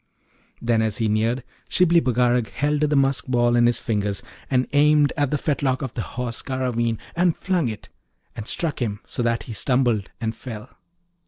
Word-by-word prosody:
Then, 115 -1 +1
as 110 -2 0
he 115 - +1
neared, 115 +4 +1 0.3
Shibli 175 -2 +4
Bagarag 125 -2 +2
held 145 +1 0
the 150 -1 +2
musk 135 -3 +2
ball 120 -1 +2
in 120 0 +5
his 120 - +2
fingers, 105 -2 -2 0.3
and 130 -1 +2
aimed 150 0 +4
at 145 -3 +1
the 150 - 0
fetlock 135 -3 0
of 130 - -4
the 115 - -3
Horse 120 +1 -4
Garraveen, 120 -4 -1 0.2
and 175 -1 +2
flung 180 -7 0
it, 110 -2 -6 0.5
and 110 -1 -7
struck 160 -5 -2
him 105 -3 -2
so - - -4
that 115 -1 0
he 115 - -7
stumbled 120 -3 +1
and 110 -1 -2
fell. 110 -4 -8
125 Hz, 180 wpm, -23 LUFS, 115-140 Hz, 0.5 s, in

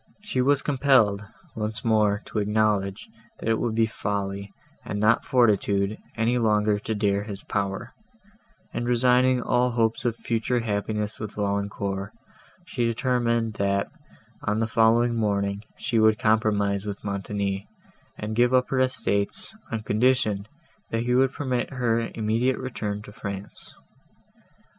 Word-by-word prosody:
She 170 -12 -1
was 140 +2 +3
compelled, 130 -8 +3 0.3
once 110 +1 -3
more, 105 -2 +2
to 110 - -3
acknowledge, 105 -2 0 0.3
that - - -7
it 115 -1 +2
would 115 -2 -1
be 115 0 +4
folly, 100 -2 -3 0.3
and 105 - -4
not 110 +2 +3
fortitude, 105 -4 +2 0.2
any 115 +2 +2
longer 105 -2 +2
to 110 +1 -3
dare 100 -1 +1
his 100 -1 -6
power; 100 -1 -3 0.8
and, 120 - -2
resigning 125 +1 +3
all 125 0 +2
hopes 115 -2 0
of 120 -2 0
future 115 +1 -1
happiness 105 0 -2
with 110 -1 -6
Valancourt, 100 -1 -2 0.5
she 135 -10 -2
determined, 115 -1 0
that, 100 0 0 0.5
on 105 +1 -1
the 115 - +2
following 115 +1 +3
morning, 100 -3 0 0.2
she 120 -4 0
would 110 -1 +5
compromise 105 -3 +1
with 100 -1 -6
Montoni, 100 0 -3 0.5
and 110 +1 -4
give 120 +2 +4
up 125 0 +2
her 130 - +1
estates, 130 - 0 0.2
on 110 -1 -3
condition, 110 -3 +1 0.4
that 115 0 -1
he 125 +1 0
would 130 +1 +4
permit 130 -4 -2
her 115 -3 0
immediate 115 +4 +1
return 105 -5 -4
to 105 - -11
France. 100 -2 -8
110 Hz, 140 wpm, -25 LUFS, 100-120 Hz, 0.8 s, would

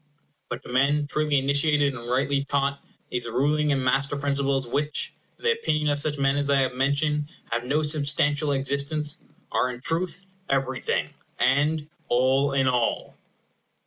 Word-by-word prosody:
But 120 +2 -5
to - - -11
men 140 +4 +2
truly 150 0 0
initiated 140 +1 +2
and 120 -1 -8
rightly 140 +2 +1
taught, 140 0 -1 0.3
these 120 -1 0
ruling 145 +5 +1
and 135 -2 0
master 135 +2 +1
principles 140 -1 0
which, 145 +4 -1 0.2
in - - -23
the 465 - +4
opinion 150 - 0
of 145 0 +2
such 150 0 +1
men 140 0 +2
as 145 0 0
I 140 -1 +4
have 130 -1 0
mentioned, 145 +3 0 0.2
have 120 +1 -1
no 150 +5 +1
substantial 145 -1 +1
existence, 140 +4 0 0.3
are 125 - +1
in 125 -1 -6
truth 175 +6 -2 0.2
everything, 135 -1 -1 0.3
and 150 +2 +2 0.2
all 130 +3 +2
in 135 -1 +2
all. 125 -2 0
140 Hz, 155 wpm, -25 LUFS, 135-150 Hz, 0.3 s, the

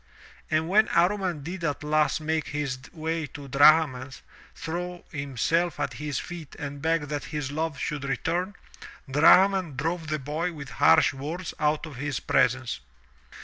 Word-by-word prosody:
And 160 +1 +1
when 215 +4 +4
Amman 180 -3 +1
did 175 +3 -6
at 150 -1 -2
last 150 -1 +2
make 155 0 -1
his 140 -3 -3
way 160 -1 -3
to 140 +1 -10
Drahman^ 140 -2 +4 0.4
throw 175 +2 -5
himself 150 +4 -1
at - - -2
his 150 -3 -4
feet 170 -5 -7
and 145 -2 -6
beg 165 0 +1
that 145 -2 -3
his 150 -3 -4
love 155 0 -2
should 145 +1 -3
return, 175 +8 -1 0.5
Drahman 180 +4 +5
drove 165 +4 -2
the 155 0 -1
boy 155 +5 -3
with 140 -4 -9
harsh - - +5
words 160 +6 -5
out 150 +1 +1
of 150 -5 -10
his 140 0 -2
presence. 130 - +1
155 Hz, 150 wpm, -26 LUFS, 140-165 Hz, 0.5 s, Drahman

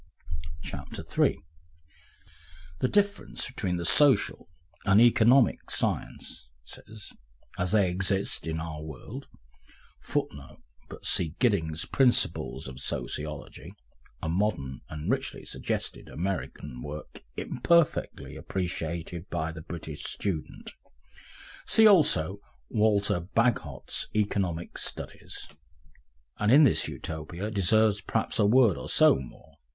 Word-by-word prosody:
Section - - -7
3 - - +1 1.4
The 130 - +2
difference 205 +5 0
between 95 -9 -2
the 85 - -3
social 140 - +3 0.3
and 100 +1 +5
economic 120 +2 +5
sciences - - -2 1.1
as 90 0 0
they 100 -4 +3
exist 95 0 -1
in 80 0 -2
our 80 -2 -5
world 75 -3 -8 0.7
[Footnote: 70 -1 -4 0.3
But - - -10
see 80 -2 +2
Gidding's 85 -10 +1
Principles 130 - +1
of 65 -1 -9
Sociology, 75 +4 -5 0.5
a - - -1
modern 80 - -1
and 75 0 -6
richly - - -2
suggestive - - -4
American 80 -7 -4
work, 75 +2 -8 0.2
imperfectly 170 +5 +1
appreciated 85 -1 -4
by 80 -2 -2
the 80 -1 -8
British 80 -2 -7
student. 90 -7 -4 1.0
See 220 - +5
also 100 - +4 0.3
Walter 105 -4 +2
Bagehot's 90 - -1
Economic 95 -5 -1
Studies.] - - -6 0.9
and 105 +1 +3
in 145 +4 +8
this 140 - +4
Utopia 85 +6 -5
deserves 105 +1 +3
perhaps 110 +4 -1
a 105 - +5
word 115 -4 +5
or - - -6
so - - +6
more. 65 - -12
90 Hz, 105 wpm, -28 LUFS, 80-110 Hz, 1.4 s, in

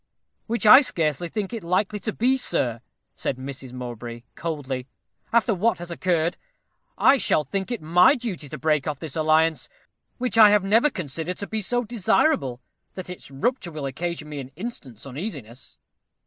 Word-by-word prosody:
"Which 235 0 -1
I 215 +6 +10
scarcely 165 - -1
think 210 +1 -4
it 225 - -5
likely 195 +4 0
to 215 - -3
be, 250 +5 +2
sir," 120 - -1 0.3
said 130 - -3
Mrs. 130 -1 -8
Mowbray, 120 -1 -7
coldly. 140 -6 -4 0.4
"After 235 -1 +3
what 215 +5 +1
has 175 0 -8
occurred, 170 -1 0 0.6
I 275 - +5
shall 155 - +2
think 190 - -3
it 240 -8 -4
my 180 - +5
duty 205 - -5
to - - -6
break 155 -3 +1
off 150 -2 -2
this 160 -1 -6
alliance, 160 0 +2 0.5
which 245 -2 0
I 215 -1 +10
have 205 -1 +4
never 225 +9 +4
considered 165 - -5
to 200 - -4
be 220 +1 -2
so 245 +5 0
desirable 215 - +1 0.3
that 185 -1 -6
its 180 - -9
rupture 175 - -2
will 150 -3 -5
occasion 165 +3 -4
me 150 -1 -6
an 130 -2 -7
instant's 150 - -7
uneasiness." 135 - -7
170 Hz, 170 wpm, -24 LUFS, 140-215 Hz, 0.6 s, I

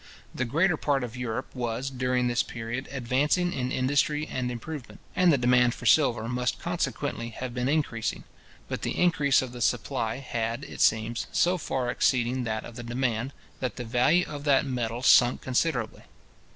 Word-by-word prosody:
The 130 - -1
greater 165 +7 +2
part 140 -3 0
of 120 -1 -6
Europe 125 0 -4
was, 125 +2 -3
during 125 -1 0
this 120 0 +2
period, 115 +3 -5
advancing 140 +7 +1
in 130 -1 -2
industry 145 +4 +1
and 130 -1 -2
improvement, 125 +3 -7 0.2
and 180 -1 +5
the 145 - +4
demand 125 -1 +3
for - - -10
silver 120 -5 +4
must 125 +1 -1
consequently 145 -8 -2
have 125 +2 -6
been 125 +1 -1
increasing; 140 -8 -1 0.4
but - - -4
the - - -3
increase 150 -7 +3
of 130 - -6
the 120 0 -8
supply 115 -1 0
had, 120 -1 -3
it - - -7
seems, 115 +1 +2
so 180 +1 +3
far 130 -5 -1
exceeded 125 0 +1
that 110 -1 -3
of 120 - -10
the 120 - -6
demand, 120 +1 -1 0.3
that 130 -2 -3
the 120 - -5
value 125 +10 +3
of 145 -1 -7
that 140 -1 +4
metal 120 -2 -3
sunk 120 -2 +5
considerably. 130 -2 -1
125 Hz, 175 wpm, -27 LUFS, 120-140 Hz, 0.4 s, and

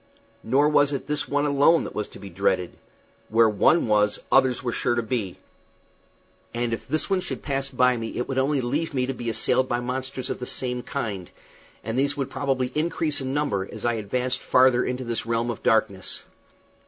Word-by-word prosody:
Nor 140 +6 +3
was 145 -1 +3
it 135 - -3
this 150 +1 -1
one 145 +1 +1
alone 145 +3 +4
that - - -7
was 105 - -3
to - - -13
be 100 -1 -10
dreaded. 90 +1 0 0.5
Where 115 +1 +5
one 110 +10 +3
was, 105 -2 +2
others 130 -2 +3
were 120 - -1
sure 120 - 0
to 120 - 0
be; 110 -5 -3 1.2
and 120 -1 -1
if 115 - -5
this 155 - 0
one 195 -2 +1
should - - -5
pass 135 -1 -2
me - - -16
by 125 0 +5
it 120 +1 -4
would 135 -1 -1
only 135 +1 +1
leave 145 +6 -2
me 125 -1 +1
to 135 - -3
be 120 -2 -4
assailed 130 +3 +1
by 120 - 0
monsters 130 +1 -4
of - - -4
the 125 - -5
same 125 -1 -2
kind, 105 -10 -4 0.5
and 115 +4 -2
these 140 +1 +1
would 135 -1 -3
probably 130 -2 -1
increase 155 -1 0
in 135 +1 -3
number 105 -11 -1
as - - -7
I 120 - +2
advanced 125 +4 -1
farther 125 -1 +4
into 125 +1 -3
this 115 -2 -3
realm 115 +1 0
of 115 - -8
darkness. 110 -4 +1
125 Hz, 205 wpm, -25 LUFS, 115-140 Hz, 1.2 s, Where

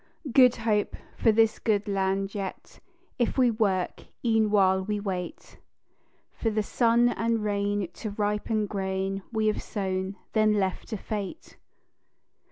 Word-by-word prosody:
"Good 250 0 +6
Hope" 215 -2 0 0.2
for 225 - +3
this 225 0 +3
good 210 -3 0
land 195 0 0
yet, 195 -2 -6 0.4
If 240 - 0
we 250 -2 +4
work, 200 -5 -1 0.2
e'en 225 -2 +3
while 190 -2 +3
we 210 +1 -2
wait 185 -3 -5 0.7
For 225 - -2
the 215 -1 0
sun 235 +2 +3
and 230 -2 0
rain 205 -1 0
to 220 - -5
ripen 210 +1 -1
grain 195 -1 -2
We 220 -1 0
have 215 - +1
sown, 190 -2 -3 0.2
then 215 -1 +4
left 190 -3 -1
to 220 - -4
fate. 210 - -6
210 Hz, 140 wpm, -27 LUFS, 195-225 Hz, 0.7 s, Good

